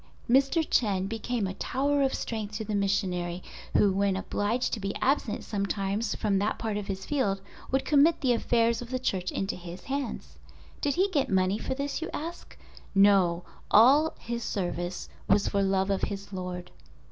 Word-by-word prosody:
Mr. 275 +6 +3
Chen 195 -5 +2
became 225 +1 -2
a 190 - -3
tower 280 +7 0
of 270 -1 +2
strength 215 -2 -4
to 220 - -4
the 210 - -3
missionary, 185 -3 0 0.3
who 205 - +5
when 195 0 +1
obliged 220 +5 -1
to 225 - -1
be 200 0 -3
absent 265 -5 0
sometimes 200 +1 -1
from 200 -3 +1
that 205 +2 0
part 220 -2 -2
of 205 -1 -4
his 190 -1 -4
field 245 -10 0 0.3
would 265 +1 0
commit 305 +3 +4
the 255 -3 +3
affairs 230 0 +2
of 240 - -8
the 255 - -1
Church 190 -8 -1
into 195 - -2
his 175 0 -9
hands. 275 -3 -4 0.4
Did 285 -1 +1
he 375 +3 +3
get 285 -6 +1
money 190 +2 +2
for 260 - -3
this, 280 +3 -3
you 330 - -3
ask. 335 +3 -7 0.4
No—all 205 - +4
his 235 0 -4
service 175 -3 -3 0.2
was 200 +1 +4
for 200 - +1
love 190 0 +1
of 195 - 0
his 200 0 -4
Lord. 180 -1 -5
210 Hz, 175 wpm, -28 LUFS, 195-255 Hz, 0.4 s, who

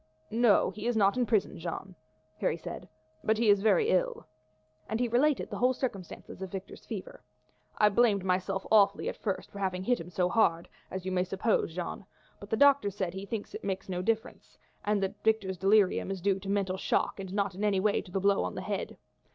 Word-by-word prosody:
"No, 230 -1 +4
he 215 +2 -5
is 240 -2 +1
not 200 -1 +4
in 250 -2 +1
prison, 215 -8 +1
Jeanne," 175 +3 -5 0.5
Harry - - 0
said, - - -8 0.3
"but 220 0 +2
he 225 -1 +2
is 200 -1 +3
very 205 -4 +3
ill." 185 - 0 0.6
And 220 +2 -1
he 245 - +1
related 260 +5 +1
the - - -4
whole 255 +1 +3
circumstances 195 -7 -6
of 190 - -4
Victor's 195 +1 -8
fever. - - -7 0.6
"I 210 - +5
blamed 205 -3 +3
myself 190 +1 0
awfully 200 -2 +4
at - - -5
first 195 -4 -4
for 200 - -9
having 185 -1 -1
hit 245 +4 +1
him 165 - -8
so 180 0 +1
hard, 175 -5 +2 0.2
as 190 -1 -6
you 190 - -2
may 180 -1 +1
suppose, 185 -2 0
Jeanne; 180 +2 -4 0.4
but 200 - -11
the 220 - 0
doctor 280 -6 +5
says 190 -3 -3
he 190 +1 -6
thinks 220 -1 -5
it - - -7
made 195 -1 -3
no 180 -1 -2
difference, 225 +4 -3 0.3
and 205 -1 +1
that 190 - -4
Victor's 205 -5 +1
delirium 195 0 +3
is 195 -1 -3
due 195 +1 +1
to 195 - -10
the - - -1
mental 195 -2 0
shock - - 0
and 190 -1 -6
not 200 -1 0
in 195 +3 -5
any 205 -2 +2
way 205 +1 +2
to - - -15
the 195 - 0
blow 200 +1 +3
on - - -4
the - - -4
head. - - -4
200 Hz, 220 wpm, -30 LUFS, 190-220 Hz, 0.6 s, I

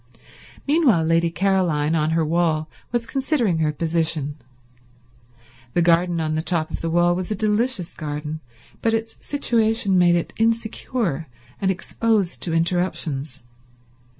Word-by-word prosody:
Meanwhile 280 - +4
Lady 165 +1 +2
Caroline, 170 -4 +1
on 155 -1 +1
her 160 0 +1
wall, 160 -1 +1 0.2
was 240 -1 -1
considering 245 - 0
her 155 -1 +2
position. 160 -2 0 1.4
The 175 - +3
garden 170 0 +3
on 155 -1 -1
the 155 - 0
top 165 -2 -1
of - - -4
the 165 - -2
wall 175 +1 +3
was 185 0 -4
a 215 - -1
delicious 215 -2 0
garden, 150 0 -5 0.4
but 225 0 +2
its 225 0 -4
situation 225 -8 +1
made 175 -1 +5
it 170 - -2
insecure 225 - -1 0.3
and 195 - +1
exposed 200 +1 0
to 170 - 0
interruptions. 165 -5 -1
175 Hz, 135 wpm, -22 LUFS, 160-220 Hz, 1.4 s, made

